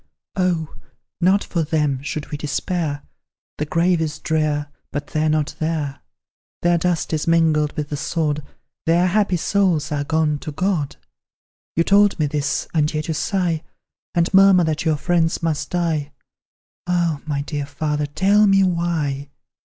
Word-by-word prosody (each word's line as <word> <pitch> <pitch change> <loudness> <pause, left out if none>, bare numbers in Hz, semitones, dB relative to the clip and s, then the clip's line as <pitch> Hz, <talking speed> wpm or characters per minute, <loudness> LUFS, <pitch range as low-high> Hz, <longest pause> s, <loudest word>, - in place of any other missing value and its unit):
"Oh! 175 -4 0 0.5
not 190 +3 +4
for 170 - -2
them, 150 -4 0
should 150 +1 -5
we 150 - -3
despair, 150 0 -2 0.6
The 150 - -1
grave 170 +2 +2
is 155 -2 -2
drear, 150 -2 -1 0.2
but 145 0 -3
they 155 - -1
are - - +2
not 155 -1 0
there; 155 -3 -2 0.6
Their 175 0 +3
dust 175 -1 -1
is 155 0 -1
mingled 160 -3 +3
with 150 -1 -3
the 145 - -3
sod, 150 -1 -1 0.5
Their 170 +2 +4
happy 190 -1 +2
souls 175 -4 +1
are 145 -1 0
gone 155 -1 +1
to 155 - -6
God! 170 -3 -1 0.8
You 165 - +3
told 205 +2 +4
me 155 - +1
this, 145 0 -1
and 155 -2 +2
yet 155 +1 -3
you - - +1
sigh, 175 -2 0 0.5
And 170 +1 +1
murmur 195 -2 +7
that 160 0 -1
your 155 -2 +2
friends 165 +1 +1
must 160 -3 -1
die. 160 -5 -1 0.7
Ah! 170 -4 +1
my 140 -2 -1
dear 145 -1 -4
father, 150 0 -2
tell 200 +8 +3
me 195 0 +5
why? 165 -6 -1
160 Hz, 160 wpm, -21 LUFS, 150-175 Hz, 0.8 s, murmur